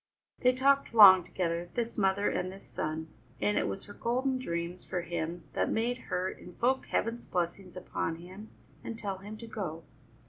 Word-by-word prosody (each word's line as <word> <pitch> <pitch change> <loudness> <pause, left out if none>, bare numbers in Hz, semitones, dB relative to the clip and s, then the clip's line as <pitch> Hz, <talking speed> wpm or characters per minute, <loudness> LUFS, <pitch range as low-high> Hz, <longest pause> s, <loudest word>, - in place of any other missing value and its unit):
They 250 0 +4
talked 275 -2 +3
long 190 -4 +10
together, 170 -1 -2
this 235 -1 -1
mother 195 0 +2
and 185 - -1
this 195 +1 -12
son, 155 +1 -4 0.3
and 105 0 +1
it - - +1
was 100 -1 -4
her 205 - -11
golden 255 +4 0
dreams 170 -4 -3
for 180 - -3
him 170 0 -3
that - - +1
made 240 +2 0
her 180 +1 0
invoke 240 +9 -1
Heaven's 230 +1 -1
blessings 180 +1 -3
upon 165 -2 -2
him 185 +6 -11 0.3
and 230 - -5
tell 195 -4 -4
him 205 +2 -8
to 230 - -9
go. 185 -8 -5
190 Hz, 175 wpm, -31 LUFS, 170-230 Hz, 0.3 s, long